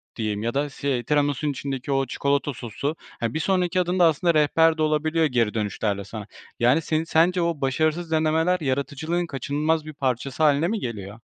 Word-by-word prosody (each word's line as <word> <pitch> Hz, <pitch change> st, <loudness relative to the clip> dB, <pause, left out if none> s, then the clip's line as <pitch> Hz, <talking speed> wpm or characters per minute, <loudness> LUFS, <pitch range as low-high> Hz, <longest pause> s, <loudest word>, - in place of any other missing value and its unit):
diyeyim 105 Hz, -2 st, -2 dB
ya 115 Hz, +1 st, -1 dB
da 145 Hz, +1 st, 0 dB
si 135 Hz, -3 st, -2 dB
tiramisunun 145 Hz, 0 st, +1 dB
içindeki 135 Hz, 0 st, -4 dB
o 135 Hz, 0 st, +2 dB
çikolata 140 Hz, +1 st, -1 dB
sosu, 125 Hz, +5 st, -4 dB, 0.2 s
hani, 115 Hz, -1 st, -2 dB
bir 160 Hz, -, -1 dB
sonraki 180 Hz, +1 st, +1 dB
adımda 180 Hz, 0 st, +2 dB
aslında 165 Hz, +2 st, +3 dB
rehber 160 Hz, +2 st, +3 dB
de -, -, -2 dB
olabiliyor 155 Hz, +1 st, +2 dB
geri 120 Hz, -7 st, +1 dB
dönüşlerle 105 Hz, -1 st, -2 dB
sana. 105 Hz, +1 st, -8 dB, 0.3 s
Yani, 125 Hz, +7 st, +4 dB
senin 155 Hz, 0 st, 0 dB
sence 170 Hz, +2 st, +2 dB
o 170 Hz, -3 st, -1 dB
başarısız 155 Hz, +5 st, 0 dB
denemeler 160 Hz, +3 st, +2 dB
yaratıcılığın 145 Hz, +4 st, -1 dB
kaçınılmaz 150 Hz, +3 st, -1 dB
bir 155 Hz, -, -8 dB
parçası 135 Hz, +1 st, -2 dB
hâline 150 Hz, +2 st, +4 dB
mi 220 Hz, +3 st, -1 dB
geliyor? 105 Hz, -, -6 dB
145 Hz, 175 wpm, -24 LUFS, 130-160 Hz, 0.3 s, Yani